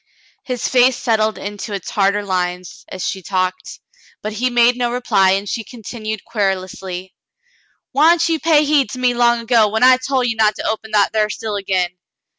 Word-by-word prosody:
His 250 -3 -3
face 250 0 +3
settled 220 -3 0
into 205 +1 -6
its 200 - -5
harder 200 0 +1
lines 180 -1 -3
as 185 - -4
she 190 - -4
talked, 185 0 -3 0.4
but 215 0 -4
he 245 +4 0
made 240 0 +4
no 245 -1 -1
reply, 195 -6 +2
and 195 +1 -2
she 225 - -3
continued 220 -2 -7
querulously: 190 -3 -3 0.8
"Why'n't 325 +5 +4
you 325 -1 0
pay 305 -2 +3
heed 285 -5 +2
to - - -6
me 250 -1 +2
long 240 -1 +2
ago, 230 -2 +3
when 220 +3 -1
I 255 0 +7
tol' 260 0 -1
ye 240 -2 0
not 215 -1 +2
to - - -4
open 220 0 -3
that 205 0 +3
thar 215 -1 +1
still 215 0 -4
again 185 -3 -2
220 Hz, 185 wpm, -18 LUFS, 195-245 Hz, 0.8 s, I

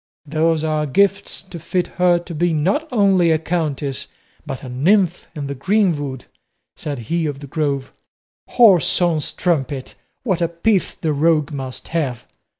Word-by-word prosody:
"Those 160 +1 +1
are 155 -1 0
gifts 200 +7 +1
to 185 -3 -9
fit 180 +3 -1 0.2
her 175 -1 +5
to 175 0 -7
be 170 +2 +1
not 195 - 0
only 195 -7 +4
a 160 - +4
countess 150 -5 -2 0.4
but 135 - -5
a - - -7
nymph 175 +8 +2
of 145 -2 -4
the 140 - -3
greenwood," 145 - 0 0.5
said 145 -2 -5 0.2
he 170 -2 +1
of 140 -2 -4
the 140 - -8
Grove; 140 -2 -2 0.6
"whoreson 175 -6 +5
strumpet! 140 -6 -1 0.3
what 170 -6 -2
pith 215 -5 +1
the 155 -3 0
rogue 155 0 +2
must 135 -3 -6
have!" 140 -8 -2
160 Hz, 150 wpm, -20 LUFS, 145-180 Hz, 0.6 s, her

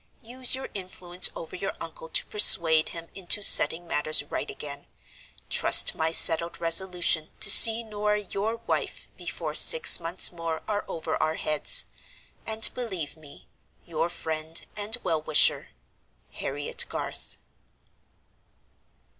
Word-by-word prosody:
Use 250 +2 0
your 265 - -9
influence 185 -2 -2
over - - -11
your - - -7
uncle - - -11
to - - -2
persuade 165 - +3
him 165 0 -11
into 195 +2 0
setting 175 -2 +3
matters 155 -2 -1
right 145 - -8
again; 140 -1 -11 0.6
trust - - +5
my 160 0 -4
settled 165 +1 +2
resolution 170 -2 -1
to 205 -2 +6
see 225 +2 +8
Norah 210 -1 -4
your 210 +3 -6
wife - - -6
before - - -9
six 480 -1 +3
months 170 +2 0
more 165 -2 -8
are 210 -1 -5
over 160 -1 -7
our 155 0 -3
heads; 155 -2 +5 0.6
and 220 0 +4
believe 190 -13 -8
me, 150 -3 -19 0.4
your 165 0 -5
friend 160 -1 -7
and 210 +3 -4
well 165 -4 -4
wisher, 155 -1 +1 0.6
"HARRIET 145 +1 -3
GARTH." - - -9
175 Hz, 130 wpm, -23 LUFS, 160-210 Hz, 0.6 s, see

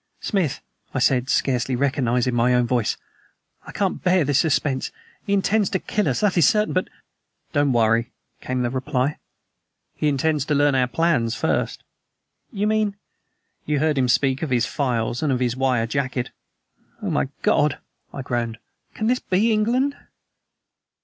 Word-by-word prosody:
"Smith," 185 - -1 0.3
I - - +1
said, 130 0 +2
scarcely 130 -1 +1
recognizing 125 -2 +1
my 120 +1 +3
own 125 0 +3
voice, 120 -2 0 0.7
"I - - -7
can't 195 -2 -2
bear 180 -2 +3
this 140 0 +2
suspense. 145 -4 0 0.4
He - - -2
intends 200 +1 +2
to - - 0
kill 210 +3 -1
us, - - 0
that 205 -3 +2
is 150 - +6
certain, 210 0 +2
but 185 - 0 0.3
" - - -45
"Don't 145 -2 +2
worry," 115 0 +2 0.3
came 130 0 -2
the 120 - -1
reply; 130 +1 -1 0.7
"he 150 - -1
intends 150 +1 +1
to 150 - 0
learn 145 0 +3
our 130 -1 +2
plans 125 -6 +1
first." - - -1 0.7
"You 205 -3 -1
mean 215 -1 +1 0.4
?" - - -49
"You 150 0 +1
heard 150 -1 +1
him 130 - +2
speak 135 +2 +2
of 160 - -2
his 120 -2 +2
files 120 -5 -1
and 150 - +1
of 125 - 0
his 125 -1 0
wire 130 -3 +1
jacket?" 130 0 -2 0.7
"Oh, - - -1
my 70 -1 0
God!" - - +2 0.3
I 135 - -6
groaned; 120 -3 -2 0.4
"can 215 - -2
this 250 +3 +2
be 205 +5 +1
England?" 245 +6 +1
140 Hz, 170 wpm, -22 LUFS, 125-180 Hz, 0.7 s, is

